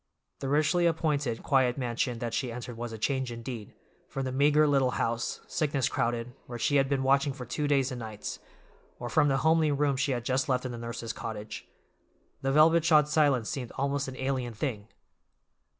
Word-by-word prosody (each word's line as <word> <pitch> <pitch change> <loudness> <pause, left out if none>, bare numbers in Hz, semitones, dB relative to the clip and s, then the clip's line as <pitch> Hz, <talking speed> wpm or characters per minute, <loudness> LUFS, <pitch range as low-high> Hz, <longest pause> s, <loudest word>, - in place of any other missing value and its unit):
The 135 - -3
richly 155 +4 +3
appointed, 150 -7 0
quiet 130 -2 +2
mansion 125 -1 -1
that 115 0 -4
she 125 0 -1
entered 120 0 -6
was 120 0 -5
a 110 - -6
change, 130 +3 -1
indeed, 115 -2 -7 0.3
from 135 -1 -3
the 130 - -2
meager 145 +3 +4
little 135 -3 +3
house, 115 +1 -1
sickness 140 -4 0
crowded, 120 +1 -1
where 120 - -6
she 145 +5 +2
had 135 -1 +2
been 135 -2 +1
watching 140 +1 +3
for 130 -2 -8
two 145 +5 -2
days 135 -2 +2
and 125 - -5
nights, 110 -2 -6 0.6
or - - -5
from 145 - +3
the 135 -1 +2
homely 160 -1 +4
room 145 -1 +1
she 135 +1 0
had 120 -2 -2
just 130 +2 0
left 125 0 +1
in 125 - -3
the 120 - -6
nurse's 115 0 -5
cottage. 110 -2 -6 0.7
The 135 - 0
velvet 160 +3 +5
shod 150 -3 +5
silence 145 -7 +3
seemed 125 -1 -4
almost 140 0 -1
an 130 -1 -7
alien 130 -3 -2
thing. 110 -4 -3
130 Hz, 195 wpm, -29 LUFS, 120-145 Hz, 0.7 s, velvet